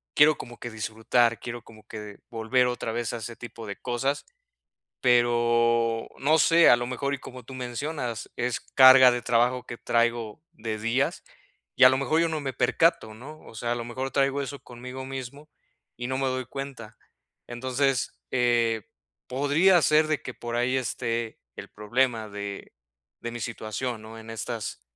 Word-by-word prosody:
quiero 150 +1 +6
como 120 -1 -9
que 120 - -6
disfrutar, 110 +1 +1
quiero 120 -2 -7
como 110 -1 -16
que 105 -2 -8
volver 120 +3 +2
otra 125 -2 -3
vez 120 0 -3
a - - -3
ese 115 +1 -7
tipo 115 -1 -9
de 100 - -6
cosas, 130 +3 -2 0.8
pero 120 -1 +3
no 155 +3 +3
sé, 165 +2 +6
a 120 - +7
lo 120 0 -3
mejor, 140 +3 -2
y - - -5
como 130 -1 -10
tú 130 - -10
mencionas, 125 -1 -4
es 120 -1 -1
carga 130 -1 +8
de 120 0 -2
trabajo 125 +1 +1
que 120 - -7
traigo 115 0 0
de 110 -1 -5
días, 115 +5 -1 0.5
y, 130 - +7
a - - +11
lo 130 - +2
mejor, 155 +4 +1
yo 170 - +2
no 160 -1 -2
me 135 -2 -3
percato, 125 -3 +2
¿no?, 145 +7 -11
o - - -13
sea, 120 +1 -2
a - - -1
lo 120 - -4
mejor, 130 +3 -4
traigo 140 0 +1
eso 140 0 -6
conmigo 125 +2 -9
mismo 135 +3 -7 0.5
y 120 - -4
no 130 0 -2
me 135 - 0
doy 130 0 -1
cuenta. 130 -5 -8 0.5
Entonces, 130 +2 -1
eh, 120 -3 +2 0.5
podría 145 +8 +4
ser 155 +3 +4
de 155 -2 0
que 125 - -7
por 120 0 -6
ahí 125 +2 +1
esté 115 -2 -2 0.2
el 100 - -8
problema 115 +1 0
de 100 -1 -7 0.5
de 120 - -5
mi 120 - -5
situación 110 +2 -4
¿no?, 110 +1 -10
en 110 0 -10
estas 115 0 -5
120 Hz, 180 wpm, -26 LUFS, 115-130 Hz, 0.8 s, a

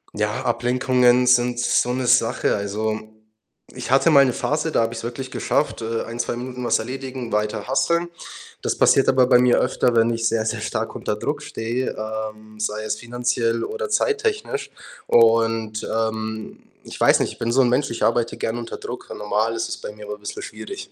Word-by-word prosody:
ja, 105 0 -1
Ablenkungen 125 +1 +3
sind 120 -1 +3
so 120 0 +2
'ne 130 0 -2
Sache. - - +3
Also, 105 +2 -2 0.7
ich - - -6
hatte 135 +4 +5
mal 140 -2 +8
'ne 125 - +2
Phase, 155 +2 -1
da - - +2
habe 115 +1 0
ich's 115 - -6
wirklich 130 +2 -5
geschafft, 150 - -1
äh, 115 0 -2
1, 115 +1 -7
2 120 - -1
Minuten 125 0 -6
was 115 - +3
erledigen, 130 0 -6
weiter 105 +1 -1
hustlen. 170 +6 +1 0.5
Das - - -1
passiert 135 - +4
aber 130 -1 +5
bei 125 -2 +6
mir 125 -1 +4
öfter, 125 -1 +1
wenn 115 +1 +4
ich 115 0 0
sehr, 110 -1 0
sehr 110 - -2
stark - - -3
unter - - -2
Druck - - -3
stehe, 120 +3 -3
ähm, 110 0 -6
sei 110 0 -2
es 110 - -1
finanziell 120 -1 -1
oder 455 0 -4
zeittechnisch 435 0 0 0.4
und, 115 -1 +3
ähm, 110 -1 -3 0.2
ich - - -10
weiß - - +5
nicht, - - -1
ich - - -20
bin 115 0 -1
so 135 +2 +4
'n 125 - +3
Mensch, 130 +3 +1
ich 115 - -3
arbeite 115 0 +1
gerne 115 +2 -2
unter 115 - -6
Druck - - -8
und - - -7
normal 110 +2 0
ist 115 0 -2
es - - -4
bei - - -7
mir 105 0 -11
aber 105 0 -6
bisschen 105 - -6
schwierig. 395 -1 -8
120 Hz, 200 wpm, -22 LUFS, 110-125 Hz, 0.7 s, mal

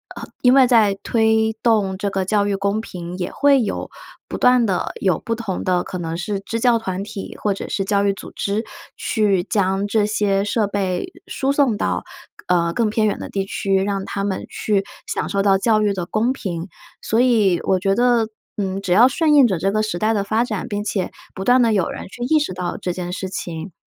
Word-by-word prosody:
呃， - - -8 0.2
因 250 0 +5
为 265 -2 +6
在 225 -5 +4
推 220 -1 +2
动 205 -5 +2
这 200 +1 -2
个 195 -1 -2
教 205 +1 +2
育 205 -1 0
公 200 +2 0
平， 180 -4 -7
也 180 -1 -3
会 280 -2 +4
有 215 - -3 0.4
不 - - -5
断 250 -1 +4
地 190 -4 -1
有 185 -4 +2
不 230 - -3
同 220 -5 -4
的 180 -1 +1
可 185 - -6
能 165 -1 -4
是 195 +3 -3
支 230 +3 -4
教 240 0 +4
团 190 -4 -4
体， 200 -1 -7
或 205 - +1
者 195 - -6
是 195 - -1
教 200 0 +1
育 200 -1 +2
组 - - -10
织， 205 +3 -1 0.3
去 205 -5 +1
将 195 0 0
这 210 0 +2
些 205 -2 +1
设 210 +1 0
备 195 - -2
输 275 -7 -1
送 275 -7 +2
到， - - -1 0.4
呃， 170 -1 +2
更 225 +1 +1
偏 215 0 +1
远 205 - -1
的 - - -6
地 195 -1 -2
区， 195 0 0
让 195 0 -1
他 200 0 -3
们 195 -2 -3
去 205 -2 0 0.2
享 - - -2
受 200 - 0
到 195 -1 +4
教 215 +2 +2
育 205 -1 +2
的 180 -3 -3
公 220 +7 0
平。 175 -9 -5 0.3
所 225 +2 +1
以 215 -9 +3
我 190 - +2
觉 195 +1 +1
得， 240 -1 +3 0.3
嗯， 195 -1 -2
只 195 -2 -4
要 220 +7 +7
顺 305 +4 +2
应 280 -4 +7
着 190 -5 -1
这 195 +4 0
个 215 +1 +1
时 215 -5 -2
代 215 +4 +1
的 200 -2 -1
发 220 +3 +1
展， 215 -6 -4
并 205 0 -3
且 195 -3 -2 0.2
不 190 - -6
断 250 +1 +5
地 230 -2 +3
有 195 -5 +1
人 - - -6
去 240 - -12
意 310 +5 +3
识 300 -10 -1
到 180 -1 -3
这 180 - -3
件 180 0 -5
事 190 +1 -4
情， 175 -1 -6
205 Hz, 245 characters per minute, -20 LUFS, 190-225 Hz, 0.4 s, 要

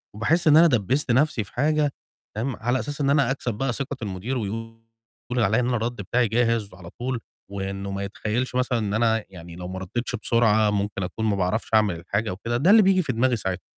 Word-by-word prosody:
وباحس 160 +11 +1
إن 155 0 +7
أنا 170 - +8
دَبّست 125 - +1
نَفْسي 135 -1 +2
في 100 - -17
حاجة 150 0 +1 0.4
فاهِم، 120 +2 -2
على 120 +4 -1
أساس 145 +1 -4
إن 140 - +2
أنا 140 -3 +3
أكسب 125 -4 -2
بقى 125 +3 -1
ثِقة 140 +1 -3
المُدير 105 +6 -3
ويقول 115 +1 -5 0.6
عليّا 110 0 +3
إن 125 - 0
أنا 125 - +1
الرَد 115 +2 -2
بتاعي 120 +5 +1
جاهز 115 -2 0
على 90 -2 -11
طول 125 +4 -4 0.3
وإنه 100 0 -4
ما 100 0 -3
يتخيّلش 110 +5 -3
مثلًا 125 -2 +1
إن 105 -2 -2
أنا 110 -1 +1
يعني 85 -2 -11
لو 90 0 -7
ما 95 +1 -5
رَدِتش 120 +7 -3
بسرعة 110 -2 +3
ممكن 100 -1 -2
أكون 110 +5 -4
ما 105 -2 +2
باعرفش 95 +4 -1
أعمل 105 -5 +4
الحاجة 105 +4 -2
وكده، 115 +6 -3
ده 155 +10 +2
اللي 220 +1 +8
بييجي 190 -2 +4
في 130 - -2
دماغي 125 +2 +2
ساعتها. 95 -4 -3
115 Hz, 215 wpm, -24 LUFS, 100-130 Hz, 0.6 s, أنا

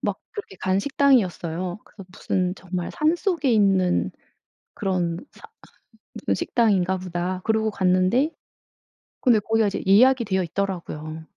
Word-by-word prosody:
막 - - -2
그렇게 405 - -8
간 185 +2 0
식당이었어요. 185 - +1
그래서 195 - -13
무슨 185 -2 -2
정말 180 -1 -5
'산속에 325 - +1
있는 185 - +2 0.6
그런 180 -4 -1 0.2
사 445 - -15 0.7
무슨 - - -2
식당인가 190 -6 +1
보다.' 180 0 -4
그러고 220 0 +1
갔는데 190 - +2 0.9
근데 240 -5 +4
거기가 220 +1 +1
이제 200 - -3
예약이 245 +5 +5
되어 190 -2 0
있더라고요. 160 -4 -4
190 Hz, 300 characters per minute, -23 LUFS, 180-225 Hz, 0.9 s, 예약이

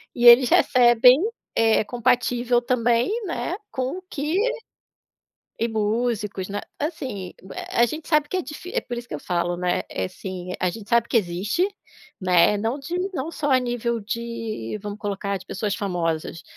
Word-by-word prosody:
e 240 0 0
eles 240 +1 +9
recebem, 245 0 +6 0.4
eh, 225 -1 +4
compatível 245 0 +1
também, 240 - +2 0.2
né, 350 0 -2 0.2
com 260 +6 -2
o - - -8
que 300 +3 -3 1.2
e 230 +1 0
músicos, 215 -3 -1
né. 205 +1 -3 0.2
Assim, 255 - -4 0.4
a 235 - +4
gente 310 +7 -6
sabe 305 -2 +3
que 370 - -4
é 370 - +1
difi 340 +4 -9
por 240 -1 -6
isso 240 0 -7
que - - -5
eu - - -7
falo, 175 +1 -1
né, 180 0 0
assim 180 - -5
a 180 - +1
gente 210 +2 -9
sabe 235 0 +3
que - - -4
existe, 200 - +1 0.5
né, 185 +2 +4
não 225 +6 -1
de 300 +5 -5 0.2
não 320 +2 -3
só 295 -2 -2
a 260 - +6
nível 240 -2 -2
de, 225 - -4
vamos 205 0 -6
colocar, 200 -1 -2
de 185 - -14
pessoas 205 +1 -2
famosas. 165 -4 -2
230 Hz, 165 wpm, -24 LUFS, 200-250 Hz, 1.2 s, eles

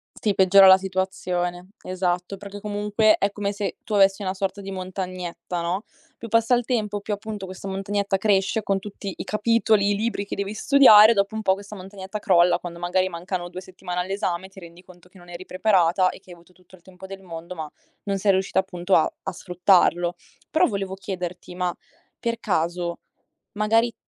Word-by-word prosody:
Sì, 210 -2 0
peggiora 190 +1 +6
la 190 0 +9
situazione, 185 -1 -3
esatto, 180 +1 -2
perché 200 +1 -9
comunque 210 +1 +2
è 200 0 +1
come 205 0 -3
se 200 0 -4
tu 215 - -6
avessi 195 0 +4
una 185 0 -1
sorta 195 +1 -3
di 195 0 -7
montagnetta, 185 -2 -5
no, 180 +5 -2 0.3
più 230 - -8
passa 230 +2 +3
il 240 -1 -1
tempo, 210 -5 -1
più 210 - -3
appunto 205 -1 -6
questa 185 +1 -8
montagnetta 195 +1 -1
cresce 200 +1 +1
con 195 -1 0
tutti 200 -1 -7
i - - -6
capitoli, 215 -1 +2
i 205 - +1
libri 215 -1 -2
che - - -5
devi 200 +2 -4
studiare. 235 -6 +7
Dopo 200 0 0
un 220 - -3
po' 190 - +4
questa 200 +2 -9
montagnetta 195 +1 -8
crolla 180 -4 +4
quando 170 -1 -8
magari 185 +2 0
mancano 175 +1 -5
2 180 +1 -8
settimane 180 -1 -6
all'esame 190 -1 -3
e - - -21
ti 195 - -14
rendi 170 0 -13
conto 180 -1 -18
che 185 +1 -19
non 175 0 -16
eri 175 +1 -9
preparata 185 -2 +2
e - - -8
che 185 -1 -17
hai - - -8
avuto 170 +1 -22
tutto 180 +1 -20
il 175 - -23
tempo 190 +1 -13
del 195 0 -9
mondo, 170 -1 -8
ma 155 -4 -7 0.3
non 200 -1 -1
sei 200 +1 +3
riuscita 190 0 +1
appunto 185 0 0
a 155 - +3
a 195 - -3
sfruttarlo. 180 -1 +2 0.3
Però 315 - +3
volevo 195 -2 -3
chiederti, 180 -2 -6
ma 180 0 -1 0.5
per 230 0 -2
caso 170 -2 -1 0.6
magari 225 +3 +2
190 Hz, 195 wpm, -24 LUFS, 180-205 Hz, 0.6 s, la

